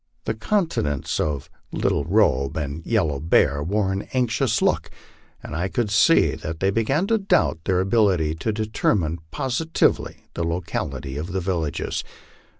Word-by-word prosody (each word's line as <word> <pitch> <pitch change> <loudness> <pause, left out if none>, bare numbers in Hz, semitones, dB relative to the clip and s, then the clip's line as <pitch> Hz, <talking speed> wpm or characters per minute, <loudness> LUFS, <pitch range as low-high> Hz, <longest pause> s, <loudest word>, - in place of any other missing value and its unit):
The - - 0
countenances 110 - -1
of 70 -3 -1 0.2
Little - - 0
Robe 70 +3 +2
and 75 +1 -4
Yellow 80 -11 +1
Bear 75 -2 +3
wore 95 +5 0
an 95 +1 -3
anxious 125 -3 +1
look, - - +1 0.5
and - - -6
I 85 +4 0
could 105 +1 -1
see 105 - +5
that 80 +1 -6
they 95 +2 +2
began 135 - +1
to 225 +2 +2
doubt 195 - +2
their 95 -2 +2
ability 95 -6 +2
to 80 +8 -2
determine 105 -6 0
positively 145 +4 0
the 85 - -2
locality 70 -5 -3
of 85 +5 -5
the 95 - 0
villages. 85 -5 -2
95 Hz, 150 wpm, -23 LUFS, 80-110 Hz, 0.5 s, see